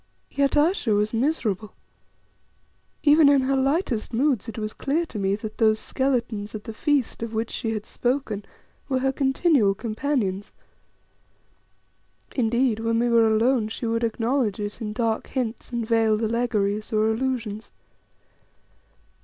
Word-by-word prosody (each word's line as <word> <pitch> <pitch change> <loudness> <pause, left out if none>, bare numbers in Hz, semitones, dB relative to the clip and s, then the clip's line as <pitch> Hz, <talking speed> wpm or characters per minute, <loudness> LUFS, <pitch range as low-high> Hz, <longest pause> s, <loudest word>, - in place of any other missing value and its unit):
Yet 280 +1 +1
Ayesha 295 - +2
was 210 +2 0
miserable. 225 - -1 1.3
Even 295 0 +6
in 280 -1 +5
her 270 +1 +1
lightest 270 - 0
moods 250 -2 +1
it 225 - -8
was 215 -1 -4
clear 310 +5 -1
to 220 - -7
me 195 0 +1
that 215 +1 -8
those 220 -1 +4
skeletons 235 -5 -2
at 210 - -6
the 225 - -7
feast 285 0 0
of 230 -1 -4
which 225 +1 -2
she 225 - -3
had 215 -1 -4
spoken 245 -5 -2 0.5
were 260 - +1
her 265 +1 +1
continual 270 - +2
companions. 215 -4 -2 1.8
Indeed, 240 -1 +1
when 230 0 0
we 240 +1 +2
were 230 -1 +5
alone 225 +1 +2
she 220 +2 -5
would 230 +1 0
acknowledge 230 -1 0
it 205 +3 -5
in 210 -2 -3
dark 225 0 -1
hints 245 -3 -4
and 235 -2 -2
veiled 225 -1 +2
allegories 215 -2 0
or 215 0 +2
allusions. 225 -3 -3
230 Hz, 145 wpm, -24 LUFS, 215-265 Hz, 1.8 s, Even